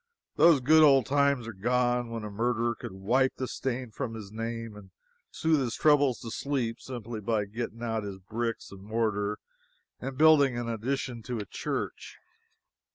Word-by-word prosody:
Those 165 -5 +6
good 155 +5 +6
old 135 -5 +6
times 140 -3 +2
are 115 - -6
gone 120 +3 +1
when 115 -1 -5
a 105 - -6
murderer 120 +2 0
could - - -8
wipe 120 +8 +1
the 130 - -3
stain 125 -2 -3
from 115 +1 -4
his 105 -3 -8
name 115 0 -5
and 100 -2 -12 0.4
soothe 160 -2 +1
his 120 -4 -2
troubles 145 -5 +4
to 115 - -7
sleep 130 -5 -2
simply 120 -3 -6
by 110 -1 0
getting 115 +2 -6
out 115 -1 -1
his 100 -2 -6
bricks 115 +4 -4
and 100 -1 -11
mortar 105 -1 -1 0.6
and 130 +1 -6
building 145 -5 +5
an 120 -1 -3
addition 120 +1 -3
to 120 +1 -4
a 105 - -4
church. - - -5
120 Hz, 170 wpm, -29 LUFS, 110-130 Hz, 0.6 s, Those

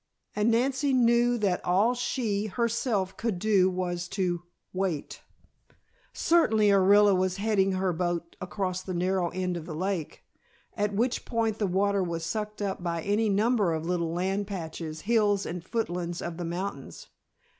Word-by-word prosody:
And 210 +2 +2
Nancy 265 +4 +1
knew 240 -1 +4
that 195 -5 0
all 195 +7 +3
she, 225 -4 -1
herself, 225 -2 -1
could 225 -5 -1
do 195 -1 +3
was 180 -1 -3
to 180 -3 -1 0.3
wait! 185 -6 -3 0.9
Certainly 220 -11 +3
Orilla 200 +1 +5
was 185 0 0
heading 200 -2 +1
her 185 -1 0
boat 170 0 -2
across 185 -1 -3
the 185 -1 -5
narrow 180 0 0
end 180 -1 -2
of 165 - -8
the 160 - -5
lake, 185 -2 -3 0.5
at 205 0 0
which 240 +4 0
point 225 -3 -1
the 205 - +1
water 200 +2 +1
was 170 -2 -3
sucked 210 +3 -3
up 190 -2 -3
by 170 -2 -2
any 210 +2 +1
number 205 -2 +2
of 160 0 -4
little 170 -2 -1
land 190 +3 -1
patches, 160 -4 -6
hills 210 -3 +2
and 175 0 -5
foothills 175 -5 -3
of 170 -1 -5
the 175 - -4
mountains. 190 - -5
195 Hz, 155 wpm, -28 LUFS, 180-215 Hz, 0.9 s, Orilla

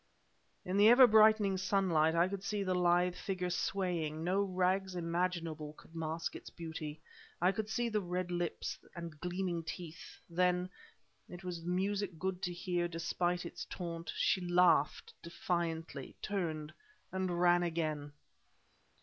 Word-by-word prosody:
In 185 +2 -1
the 205 +2 +8
ever 250 +2 +9
brightening 215 -3 +5
sunlight 180 -4 +2
I 170 +2 +4
could 195 0 -5
see 205 0 -1
the 185 -1 0
lithe 180 0 +3
figure 180 -1 -3
swaying; 170 -5 -1
no 185 +3 +2
rags 190 0 0
imaginable 165 -3 -2
could 160 - -18
mask 160 0 -3
its - - -8
beauty. 160 -2 -6 0.4
I 180 +2 +4
could 215 +2 -3
see 240 +2 0
the 215 -2 0
red 180 0 -3
lips 175 -1 -2 0.2
and 170 -3 -7
gleaming 180 -1 -2
teeth. 165 0 -8
Then 180 +1 +1 0.6
and 180 - -8
it 175 - -14
was 175 -2 -5
music 190 +1 -1
good 185 +1 -2
to 180 - -1
hear, 175 0 -1
despite 175 +1 -1
its - - -6
taunt 170 -2 -5
she 190 - +2
laughed 175 -4 +3
defiantly, 165 -4 -3
turned, 160 -6 -2 0.4
and 185 -2 -1
ran 175 0 +5
again! 155 -4 -2
175 Hz, 145 wpm, -34 LUFS, 165-190 Hz, 0.6 s, ever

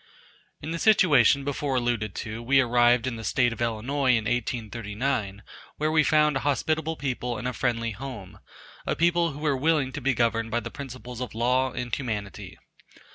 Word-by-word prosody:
In 155 - -4
the 170 - -3
situation 145 - +5
before 140 -1 -2
alluded 120 -5 -1
to 110 +2 -5
we 135 +3 +3
arrived 120 -1 +4
in 125 -3 -3
the 115 - -7
state 120 +3 +1
of 115 - -9
Illinois 120 +5 -1
in 115 -2 +1
1839, 110 -2 -2 0.3
where 155 +1 0
we 155 0 +4
found 150 -1 +3
a - - -1
hospitable 155 +3 0
people 125 -4 -3
and 110 +4 -4
a 125 - -2
friendly 115 -3 -1
home; 115 -4 -8 0.5
a - - 0
people 170 -1 +2
who 145 - -9
were 150 -2 +1
willing 145 -1 +1
to 145 - -6
be 135 0 +1
governed 115 -1 +1
by 120 - 0
the - - -7
principles 130 -3 -8
of 125 -3 -5
law 125 +3 +1
and 120 -1 -5
humanity. 105 - -5
125 Hz, 185 wpm, -26 LUFS, 115-140 Hz, 0.5 s, situation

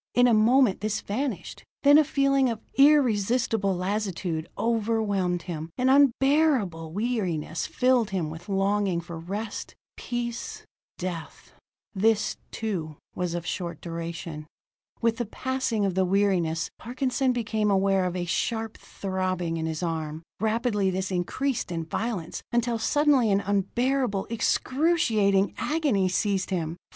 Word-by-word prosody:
In 245 - +6
a 240 - +4
moment 220 -1 +4
this 215 0 -1
vanished. 215 - -4 0.2
Then 290 +1 +8
a - - +6
feeling 275 -2 +2
of 225 -2 -3
irresistible 230 -7 +3
lassitude 185 -4 -2
overwhelmed 210 -6 0
him; 165 -3 -5
an 255 +1 +2
unbearable 270 - +3
weariness 185 -7 -2
filled 250 -4 +2
him 175 -6 -2
with 165 +4 -10
longing 195 -2 +1
for 170 -1 -8
rest, 205 +6 -5 0.2
peace 240 -1 -5 0.3
death. 175 -3 -6 0.4
This, 215 +2 +1
too, 170 -9 -4 0.2
was 175 -1 -2
of 175 0 -4
short 175 -3 -4
duration. 165 -2 -6 0.6
With 230 -1 +2
the 240 - -1
passing 260 -3 -1
of 195 - 0
the 190 +1 +2
weariness, 180 -4 +1
Parkinson 255 +2 0
became 220 -3 0
aware 195 -1 +2
of 180 0 -2
a 180 -1 -2
sharp 225 +5 -2
throbbing 185 -3 -3
in 160 0 -2
his 160 +2 -3
arm. 160 -1 -3 0.2
Rapidly 220 -2 +1
this 190 +1 -2
increased 225 +6 -1
in 165 -1 -3
violence, 185 -1 -3
until 240 -1 +1
suddenly 280 -1 +3
an 200 0 +3
unbearable, 205 +3 0
excruciating 230 - +2
agony 280 - +1
seized 195 0 0
him. 165 -4 -2
205 Hz, 130 wpm, -26 LUFS, 180-240 Hz, 0.6 s, Then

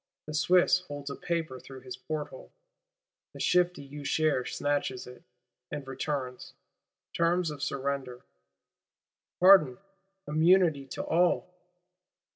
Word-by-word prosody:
The 155 - -7
Swiss 180 +3 +4
holds 145 -5 -7
a - - -5
paper 165 -7 -3
through 135 0 -12
his 125 -1 -8
porthole; 150 +3 -6 0.8
the - - -11
shifty 180 -5 +1
Usher 145 -2 +1
snatches 145 -3 -2
it, 125 0 -12 0.5
and 145 - -6
returns. 135 -1 -4 0.6
Terms 170 0 +1
of 145 -2 -8
surrender: 135 -3 -3 1.1
Pardon, 180 -9 +7 0.5
immunity 160 -2 +3
to - - -5
all! 180 +1 +1
145 Hz, 105 wpm, -29 LUFS, 135-170 Hz, 1.1 s, Pardon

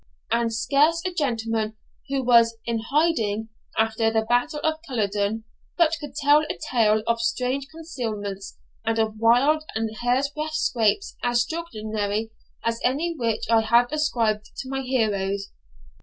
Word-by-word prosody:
And 235 0 +2
scarce 285 +8 +2
a 370 - -1
gentleman 225 -7 -1 0.3
who 275 -1 0
was 230 -2 +5
'in 230 -1 -1
hiding' 230 -9 +1 0.3
after 225 0 +2
the 220 0 +1
battle 245 +7 +1
of 315 -1 0
Culloden 210 -3 -1 0.3
but 330 -2 +4
could 290 -2 -8
tell 295 0 +5
a - - -3
tale 215 -3 +3
of 230 0 +1
strange 255 +3 -1
concealments 220 - -5 0.3
and 225 0 0
of 220 -1 0
wild 255 +7 +4
and 220 0 -2
hair'sbreadth'scapes 255 -4 0
as 240 0 +3
extraordinary 220 -9 -3 0.3
as 230 0 -1
any 300 +7 +1
which 230 -6 -1
I 225 0 +4
have 235 +3 +3
ascribed 230 -9 0 0.2
to 260 - -9
my 270 0 -2
heroes. 200 -6 -1
235 Hz, 140 wpm, -24 LUFS, 220-280 Hz, 0.3 s, was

